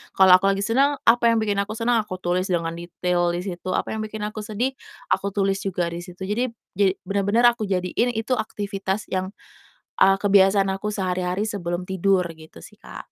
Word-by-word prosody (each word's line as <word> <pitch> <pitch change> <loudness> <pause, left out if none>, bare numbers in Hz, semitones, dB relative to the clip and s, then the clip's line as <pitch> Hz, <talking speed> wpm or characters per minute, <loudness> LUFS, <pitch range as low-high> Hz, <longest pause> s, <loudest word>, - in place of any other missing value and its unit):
kalau 190 -1 +8
aku 195 +2 +2
lagi 195 - -1
seneng 270 +6 +2
apa 235 0 +5
yang 230 - +2
bikin 205 -2 0
aku 205 - -8
senang 235 0 +2
aku 185 -3 -7
tulis 180 +1 -1
dengan 165 -1 -1
detail 175 0 -1
di - - -2
situ. 185 -1 -5
Apa - - -2
yang 220 - -3
bikin 215 0 -6
aku 215 +1 -7
sedih 220 +5 -2 0.4
aku 200 - +1
tulis 195 -1 +1
juga 180 -3 -1
di 170 - -5
situ. 180 +1 -10
Jadi 235 +4 -1
b - - -30 0.2
ja 200 - +5 0.2
benar-benar 200 +4 +3
aku 220 - -5
jadiin 190 +6 0
itu 225 +3 0
aktivitas 205 -2 -3
yang, 185 0 -2 0.7
eee, 195 0 +6
kebiasaan 195 -1 +4
aku 210 +2 -3
sehari-hari 185 0 -1
sebelum 175 -4 -3
tidur, 190 0 +2
gitu, 160 - -15
sih, - - -14
Kak. - - -10
195 Hz, 195 wpm, -23 LUFS, 180-215 Hz, 0.7 s, kalau